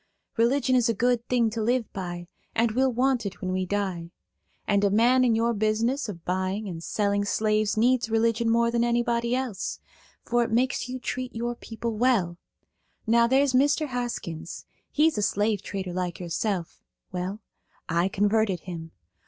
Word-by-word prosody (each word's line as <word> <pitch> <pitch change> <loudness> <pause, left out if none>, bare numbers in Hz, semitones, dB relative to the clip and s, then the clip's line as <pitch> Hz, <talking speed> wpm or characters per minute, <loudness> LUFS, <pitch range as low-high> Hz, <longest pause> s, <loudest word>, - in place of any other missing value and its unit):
Religion 255 +3 +2
is 245 -2 +3
a 230 - +1
good 245 +2 +1
thing 235 -3 +2
to 225 0 -3
live 235 0 0
by, 175 -2 -5 0.3
and 230 0 +2
we'll 260 +3 +2
want 255 0 +1
it 200 -2 -6
when 185 - -3
we 185 0 -1
die. 185 -4 -2 0.6
And 200 -1 +2
a 200 - +4
man 240 +5 +4
in 235 -3 +3
your 230 +1 +2
business 225 +5 0
of 170 -5 -8
buying 190 +3 -1
and 170 -3 -6
selling 205 +1 0
slaves 215 +1 +1
needs 245 0 +3
religion 230 +1 +2
more 235 0 +3
than 235 0 +1
anybody 235 0 +1
else, 250 -8 -3 0.5
for 240 0 +2
it - - -3
makes 250 +2 0
you 255 - -3
treat 250 0 -4
your 240 +1 -2
people 230 -1 -5
well. 205 -8 +2 0.7
Now 235 +1 +4
there's 265 +2 +3
Mr. 290 +3 +3
Haskins–he's 245 - -2
a - - 0
slave 205 0 +1
trader 190 -3 -5
like 180 -1 -3
yourself. 180 +1 -3 0.3
Well, 185 +3 -4 0.5
I 170 +3 +1
converted 205 -2 +1
him. 165 -3 -8
225 Hz, 165 wpm, -26 LUFS, 195-240 Hz, 0.7 s, a